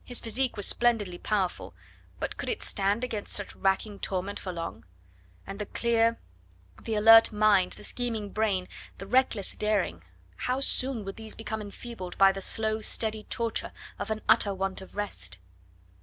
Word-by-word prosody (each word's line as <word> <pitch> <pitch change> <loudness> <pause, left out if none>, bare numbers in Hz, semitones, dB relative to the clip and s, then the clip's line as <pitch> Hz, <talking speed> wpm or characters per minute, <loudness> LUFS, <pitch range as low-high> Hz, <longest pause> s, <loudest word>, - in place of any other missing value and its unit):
His 245 - +2
physique 240 +2 -1
was 205 - +3
splendidly 215 -7 +2
powerful, 195 -4 -2 0.4
but - - -3
could - - -4
it 455 - -3
stand 200 +4 +1
against 220 -5 -4
such 205 - -3
racking 195 +1 0
torment 195 +1 -3
for 185 - -5
long? 165 -10 -6 0.6
And 195 +1 -8
the 210 - -4
clear, 230 -1 +2 0.6
the 220 - -3
alert 225 +2 +8
mind, 210 -3 +3
the - - -10
scheming 225 -5 -1
brain, 200 -4 0 0.3
the 195 - -8
reckless 230 -2 +1
daring 210 - 0 0.4
how 255 +1 -1
soon 260 -4 +1
would 195 - -6
these 220 -1 -7
become 220 -1 -5
enfeebled 205 -2 -8
by 195 0 +7
the 195 0 -6
slow, 220 +2 +1
steady 215 0 +1
torture 230 -2 -2 0.3
of - - -4
an 215 0 -3
utter 200 -1 +5
want 190 0 -3
of 190 - -13
rest? 90 - -5
210 Hz, 165 wpm, -28 LUFS, 195-225 Hz, 0.6 s, alert